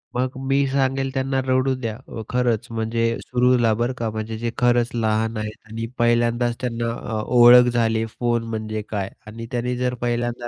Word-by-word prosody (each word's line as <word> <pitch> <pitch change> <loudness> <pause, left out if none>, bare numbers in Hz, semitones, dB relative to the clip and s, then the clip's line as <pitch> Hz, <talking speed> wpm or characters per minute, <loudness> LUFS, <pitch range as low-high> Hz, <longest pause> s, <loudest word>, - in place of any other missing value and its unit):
मग 125 +1 0 0.2
मी 135 0 +2
सांगेल 135 0 0
त्यांना 135 0 0
रडू 130 +1 +2
द्या.अ, 115 0 -6
खरंच 125 -3 0
म्हणजे 115 +1 -1 0.2
सुरूला 125 -2 +2
बरं 120 +3 -1
का 115 -2 -2
म्हणजे 110 0 -5
जे 115 0 -3
खरंच 120 -1 +3
लहान 110 -1 0
आहेत 110 0 -4
आणि 115 +1 -4
पहिल्यांदाच 120 0 +2
त्यांना 120 -2 -2
अ, 110 -2 -4 0.2
ओळख 120 +1 +8
झाली 115 -1 +1
फोन 120 -1 +1
म्हणजे 110 -1 -3
काय 100 -3 -3 0.2
आणि 115 +2 -7
त्याने 125 0 -1
जर 125 0 0
पहिल्यांदा 120 0 -2
120 Hz, 165 wpm, -22 LUFS, 115-125 Hz, 0.2 s, ओळख